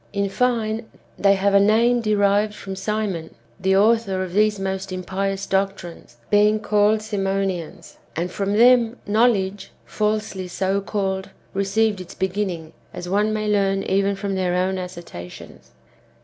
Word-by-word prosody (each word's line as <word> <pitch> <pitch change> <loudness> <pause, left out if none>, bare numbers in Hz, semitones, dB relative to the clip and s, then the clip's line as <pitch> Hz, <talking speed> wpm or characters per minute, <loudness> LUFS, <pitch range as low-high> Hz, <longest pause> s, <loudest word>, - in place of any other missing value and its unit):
In 200 -1 0
fine, 225 -1 0 0.3
they 200 0 +5
have 195 +1 +1
a 200 - +7
name 230 +4 +3
derived 210 -1 +2
from 195 -2 -7
Simon, 195 -5 -3 0.2
the 190 0 +2
author 205 -3 +2
of 180 -2 -7
these 210 0 +2
most 190 0 -3
impious 195 +2 -3
doctrines, 190 -9 -3
being 210 +1 +4
called 210 0 +2
Simonians; 195 -4 -3 0.2
and 175 +2 -2
from 200 +1 -2
them 240 +1 +5
" - - -34
knowledge, 205 -3 +1 0.2
falsely 210 -3 -2
so 190 +2 -1
called," 190 -2 -2
^ - - -17 0.2
received 200 +1 +1
its 180 - -11
beginning, 185 -4 -3 0.2
as 175 - -7
one 205 +3 +1
may 215 0 -2
learn 195 -2 +1
even 195 +1 +1
from 195 0 -3
their 185 -2 0
own 185 +1 0
assertions. 170 - -9
195 Hz, 150 wpm, -22 LUFS, 190-210 Hz, 0.3 s, a